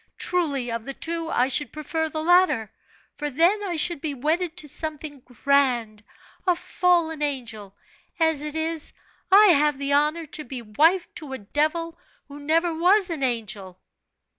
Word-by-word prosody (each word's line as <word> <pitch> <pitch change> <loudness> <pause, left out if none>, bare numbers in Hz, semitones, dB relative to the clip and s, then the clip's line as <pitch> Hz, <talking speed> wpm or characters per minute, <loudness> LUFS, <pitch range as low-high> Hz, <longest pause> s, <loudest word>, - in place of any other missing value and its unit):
Truly 285 -9 -1
of 230 -1 -4
the 275 - -6
two 330 0 -4
I 250 -4 +2
should 280 +2 -1
prefer 320 +1 -3
the 310 0 -4
latter, 350 - +3 0.4
for 295 0 -4
then 340 +9 +2
I 365 -4 -3
should 330 -1 -1
be 300 -3 -3
wedded 320 +6 -1
to 310 - -2
something 300 -1 -4
grand 245 -4 0 0.4
a 360 - +4
fallen 340 -3 0
angel; 230 -9 -4 0.4
as 320 -3 +2
it 300 0 -5
is, 320 -1 -2 0.4
I 410 +2 +8
have 300 -3 +4
the 280 0 -1
honor 300 +3 +2
to 305 +1 -4
be 250 -3 -7
wife 320 - +2
to 290 -4 -8
a - - -4
devil 310 +9 -2 0.3
who 285 0 -11
never 325 +3 +1
was 360 +3 +3
an 315 -4 -4
angel?" 215 -7 -3
300 Hz, 165 wpm, -24 LUFS, 265-330 Hz, 0.4 s, I